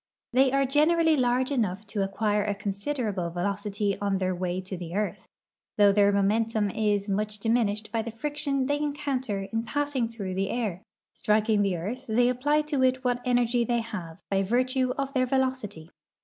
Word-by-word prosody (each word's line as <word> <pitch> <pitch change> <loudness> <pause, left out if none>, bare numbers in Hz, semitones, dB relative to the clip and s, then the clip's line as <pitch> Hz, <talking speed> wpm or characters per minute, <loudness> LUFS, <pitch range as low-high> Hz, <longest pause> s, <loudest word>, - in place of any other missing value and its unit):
They 260 +1 +4
are 275 0 +2
generall}' 315 +4 +3
large 255 0 +1
enough 215 -6 -1
to 205 0 -3
acquire 205 +1 0
a 205 -1 -1
considerable 200 -2 -2
velocit}'' 200 +3 -2
on 200 -1 +1
their 185 -1 -1
wa}^ 180 +1 -3
to 190 - -5
the 175 -1 -7
earth, 210 0 -2 0.5
though 205 -1 +6
their 200 0 +4
momentum 210 +1 +1
is 205 -1 0
much 210 +1 -1
diminished 215 -1 0
l)y 225 - +1
the 230 - -5
friction 280 +2 -2
they 290 +2 0
encounter 280 -8 -2
in 225 - +1
passing 285 0 -1
through 205 -5 -5
the 195 +1 -1
air. 210 -7 -2 0.3
Striking 215 0 +2
the 195 -3 +1
earth, 235 +10 -5
they 245 +3 +3
appl}' 295 +4 +1
to 295 -3 -1
it 255 0 +2
what 245 -1 0
energy 245 -1 +2
they 235 0 0
have 175 -7 -7
by 195 0 +2
virtue 255 +5 +1
of 275 -1 -2
their 255 -2 +2
velocity. 250 -11 -2
225 Hz, 175 wpm, -27 LUFS, 200-255 Hz, 0.5 s, though